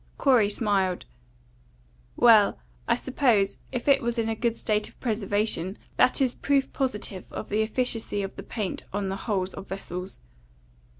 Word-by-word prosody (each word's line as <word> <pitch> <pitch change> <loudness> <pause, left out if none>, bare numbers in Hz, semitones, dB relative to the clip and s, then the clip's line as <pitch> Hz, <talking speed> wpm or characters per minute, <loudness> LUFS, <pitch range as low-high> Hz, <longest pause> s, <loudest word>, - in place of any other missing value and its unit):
Corey 245 -7 +4
smiled. 200 -4 0 1.1
"Well, 220 -4 +6 0.3
I 235 - +4
suppose, 245 -6 +1
if 250 -1 -4
it 280 -1 +5
was 235 -1 -1
in 225 -1 0
a 225 - -1
good 235 0 0
state 210 -2 -1
of - - -22
preservation, 205 -4 -1 0.2
that - - +4
is 255 -2 +2
proof 275 -1 0
positive 210 -8 -3
of - - -6
the 210 +2 +1
efficacy 225 -2 -1
of 195 - -6
the - - -7
paint 210 -5 -4
on 200 -1 -2
the 190 - -2
hulls 190 -2 0
of 195 - -8
vessels." 185 -1 -6
215 Hz, 160 wpm, -26 LUFS, 195-240 Hz, 1.1 s, Well